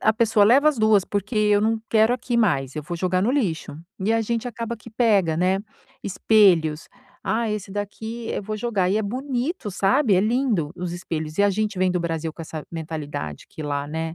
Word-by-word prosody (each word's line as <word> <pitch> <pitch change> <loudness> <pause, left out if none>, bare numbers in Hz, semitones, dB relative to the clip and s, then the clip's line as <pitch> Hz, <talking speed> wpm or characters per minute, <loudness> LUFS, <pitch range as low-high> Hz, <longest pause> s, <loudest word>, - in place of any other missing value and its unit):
a 220 - +3
pessoa: 225 -2 +3
"Leva 270 +8 +6
as 295 - +1
2, 215 -3 +4
porque 205 +3 -3
eu 210 -1 +4
não 220 +1 +1
quero 220 +1 +4
aqui 245 -1 -2
mais, 140 - +1
eu 150 - -3
vou 170 +4 -5
jogar 185 +1 0
no 220 - +2
lixo". 170 - -1 0.2
E 210 +4 +1
a 225 - +2
gente 230 +2 -2
acaba 230 0 -5
que 220 +1 -14
pega, 205 -8 +2
né. 185 +3 +2 0.4
Espelhos: 180 -6 +3 0.3
"Ah, 230 0 0
esse 210 -2 -4
daqui 220 +3 -5
eu - - -3
vou 215 +1 -4
jogar". 205 -5 0
E 205 - +2
é 220 - +1
bonito, 255 - -3
sabe, 205 +5 +2
é 185 - +4
lindo 215 - 0
os 175 -1 -4
espelhos. 160 -3 -5
E - - +5
a 205 - +4
gente 210 -1 -2
vem 185 0 +2
do 180 - 0
Brasil 165 -1 -3
com 165 - -9
essa 155 -1 -7
mentalidade 150 - -5
que 155 - -8
lá, 145 -1 -2
né, 160 +2 -4
205 Hz, 210 wpm, -23 LUFS, 170-225 Hz, 0.4 s, Leva